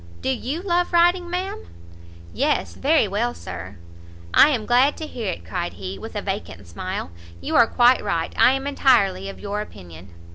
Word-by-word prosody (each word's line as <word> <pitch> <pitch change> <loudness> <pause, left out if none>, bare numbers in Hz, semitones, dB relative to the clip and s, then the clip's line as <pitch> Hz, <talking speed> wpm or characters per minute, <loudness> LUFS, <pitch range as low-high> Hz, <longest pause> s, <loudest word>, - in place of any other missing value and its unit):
Do - - 0
you 265 +6 -3
love 355 -2 0
riding, 350 +1 +3
ma'am?" 360 - -4 0.7
"Yes, 85 - 0
very 300 -5 +2
well, 230 +5 -1
Sir." 90 +2 -8 0.6
"I - - +7
am 240 -7 -1
glad 255 +5 +3
to 315 - -5
hear 230 -9 -4
it," - - -8
cried 175 -1 -4
he, 95 0 -7
with - - -9
a - - -3
vacant 90 +4 -5
smile; 85 0 -5 0.3
"you 90 - -3
are 235 - +6
quite 245 +2 +4
right; 170 -5 -2
I 255 - +5
am 270 0 -3
entirely 200 -9 +2
of 195 - -10
your 205 0 -3
opinion." 90 - -11
230 Hz, 180 wpm, -22 LUFS, -, 0.7 s, I